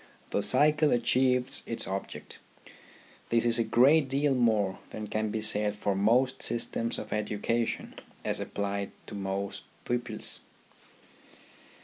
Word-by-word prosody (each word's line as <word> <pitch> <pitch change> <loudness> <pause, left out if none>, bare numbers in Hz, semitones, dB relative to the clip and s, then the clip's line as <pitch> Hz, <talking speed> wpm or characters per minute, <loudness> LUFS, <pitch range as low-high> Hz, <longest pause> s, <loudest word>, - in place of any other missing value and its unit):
The - - +1
cycle 150 +8 +4
achieves 125 +1 +3
its 115 - -3
object. 95 0 -6 0.9
This 115 0 +2
is 120 0 +2
a - - +3
great 135 +6 +4
deal 140 +1 +2
more 110 -6 +2
than 110 - -6
can 110 +1 -2
be 110 +1 -2
said 105 -1 -1
for 105 -1 -1
most 120 +7 +2
systems 115 0 -1
of - - -5
education 105 +2 -1 0.3
as - - 0
applied 100 0 -3 0.2
to - - -10
most 100 0 -3 0.2
pupils. 120 -2 -1
115 Hz, 125 wpm, -29 LUFS, 105-125 Hz, 0.9 s, cycle